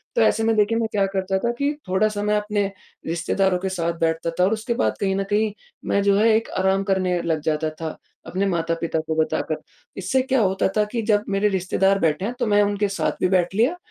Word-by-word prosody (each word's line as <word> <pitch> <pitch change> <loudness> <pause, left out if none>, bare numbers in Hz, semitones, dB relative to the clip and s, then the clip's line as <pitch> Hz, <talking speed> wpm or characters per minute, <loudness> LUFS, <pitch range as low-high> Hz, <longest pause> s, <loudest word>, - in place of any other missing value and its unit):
तो 485 - +3
ऐसे 225 - +3
में 225 0 +2
देखिए 210 +2 +2
मैं 230 -1 0
क्या 200 -2 +2
करता 190 0 -1
था 235 - 0
कि 285 +1 0
थोड़ा-सा 205 +2 +1
मैं 210 0 +1
अपने 210 -1 0 0.4
रिश्तेदारों 180 +3 +1
के 190 +1 -2
साथ 170 -2 -1
बैठता 165 0 0
था - - +5
और 195 +4 +3
उसके 225 +2 -2
बाद 260 - 0
कहीं 195 -1 0
न 195 - 0
कहीं 210 +1 +1 0.4
मैं 200 - +2
जो 200 0 +4
है 215 +2 +4
एक 225 - 0
आराम 190 +1 +2
करने 185 -3 0
लग 160 -2 0
जाता 155 0 0
था, 155 0 -6 0.3
अपने 185 +4 -1
माता-पिता 165 -2 -1
को 160 - -1
बताकर, 160 0 0 0.4
इससे 195 +8 +1
क्या 265 0 +1
होता 190 -2 +2
था 210 - +4
कि 235 - -1
जब 210 -1 +2
मेरे 200 +1 +2
रिश्तेदार 195 +1 +1
बैठें 170 +6 0
तो 240 - 0
मैं 205 0 +4
उनके 205 0 0
साथ 195 - 0
भी - - +4
बैठ 180 0 +1
लिया 240 - +2
195 Hz, 225 wpm, -23 LUFS, 180-210 Hz, 0.4 s, था